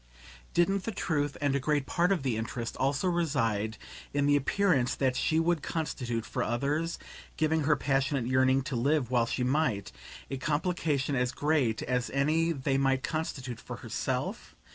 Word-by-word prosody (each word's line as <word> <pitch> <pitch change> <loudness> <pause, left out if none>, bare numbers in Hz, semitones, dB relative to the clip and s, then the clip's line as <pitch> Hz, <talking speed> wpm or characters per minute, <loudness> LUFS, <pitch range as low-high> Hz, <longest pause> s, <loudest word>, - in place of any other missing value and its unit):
Didn't 190 +2 +2
the 225 - -1
truth 145 -7 -1
and 145 -1 +2
a - - +2
great 145 +1 0
part 175 +5 +1
of 180 -8 +1
the 130 -4 0
interest 115 +1 -4
also 140 +7 +1
reside 115 - 0 0.4
in 145 0 +2
the 145 0 +4
appearance 145 -3 +2
that 130 -2 +1
she 160 +4 +2
would 165 -1 +1
constitute 125 -9 -3
for - - -3
others 145 +8 -1 0.4
(given 160 -1 +1
her 150 +1 +4
passionate 135 -2 0
yearning 130 +1 +3
to 135 - -4
live 130 +1 +1
while 120 -2 +3
she 125 - -1
might) 125 -7 0 0.4
a 135 - -2
complication 150 -1 0
as 125 -1 +1
great 145 -7 +1
as 125 0 -1
any 155 +4 +2
they 135 -2 0
might 135 -1 +2
constitute 135 -6 -3
for - - -7
herself? - - -3
140 Hz, 165 wpm, -29 LUFS, 125-155 Hz, 0.4 s, the